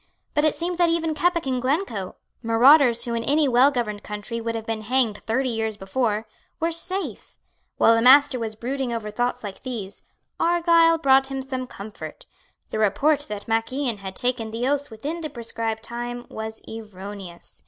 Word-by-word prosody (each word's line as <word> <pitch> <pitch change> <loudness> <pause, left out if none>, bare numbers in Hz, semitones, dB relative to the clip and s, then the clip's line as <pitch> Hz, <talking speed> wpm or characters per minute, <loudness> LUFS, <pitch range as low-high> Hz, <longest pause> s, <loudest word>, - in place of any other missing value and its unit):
But 295 - +2
it 310 - +2
seemed 350 +1 -3
that 345 -1 +4
even 330 -1 0
Keppoch 340 +1 +1
and 255 -2 -1
Glencoe, 255 - -1 0.3
marauders 240 +2 +5
who 235 - -3
in 230 0 -1
any 290 +3 +3
well 255 +2 +5
governed 225 -6 -3
country 210 +3 -5
would 230 0 -3
have 225 -1 -4
been 225 -1 -3
hanged 230 -2 +1
thirty 255 +4 -1
years 220 -2 -2
before, 215 +2 -1 0.3
were 330 +1 0
safe. 375 +4 -2 0.4
While 225 - +6
the 230 - +3
Master 265 +1 +6
was 220 -2 -4
brooding 255 +3 -3
over 220 -2 -4
thoughts 245 +3 -1
like 200 -2 -6
these, 225 -7 -6 0.4
Argyle 335 -1 +4
brought 270 -3 +4
him 270 -1 -4
some 260 -1 -4
comfort. 205 -2 -9 0.5
The - - -2
report 280 +9 +2
that 210 -1 -6
Mac 225 +1 0
Ian 260 -4 -1
had 190 -1 -7
taken 245 -3 -1
the 230 +3 -2
oaths 285 0 0
within 290 +10 -5
the 310 - -4
prescribed 225 -3 -4
time 240 +1 -5
was 220 0 -7
erroneous. 200 -4 -9
240 Hz, 180 wpm, -24 LUFS, 220-280 Hz, 0.5 s, While